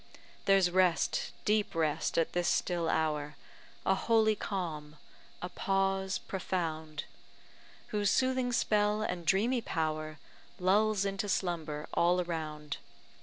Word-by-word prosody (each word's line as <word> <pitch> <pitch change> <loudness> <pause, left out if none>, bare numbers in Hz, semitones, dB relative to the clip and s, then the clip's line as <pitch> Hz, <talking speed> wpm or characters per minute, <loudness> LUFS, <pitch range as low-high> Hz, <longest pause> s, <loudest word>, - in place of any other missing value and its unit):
There's 195 -2 +4
rest, 180 -2 +2
deep 210 -3 +1
rest, 155 -3 0
at 165 - +1
this 175 0 +1
still 170 -2 +1
hour 150 -2 0 0.5
A 190 - +4
holy 220 +2 +3
calm, 160 -8 -4 0.5
a 180 - -3
pause 195 0 0
profound; 160 -5 -3 0.9
Whose 205 -2 +1
soothing 255 +1 +2
spell 210 -2 +2
and 175 -5 -3
dreamy 230 +7 +3
power 155 -4 -2 0.4
Lulls 200 +2 +3
into 195 +1 -2
slumber 160 -6 -2
all 175 +1 +3
around. 155 -4 -4
180 Hz, 115 wpm, -31 LUFS, 160-200 Hz, 0.9 s, There's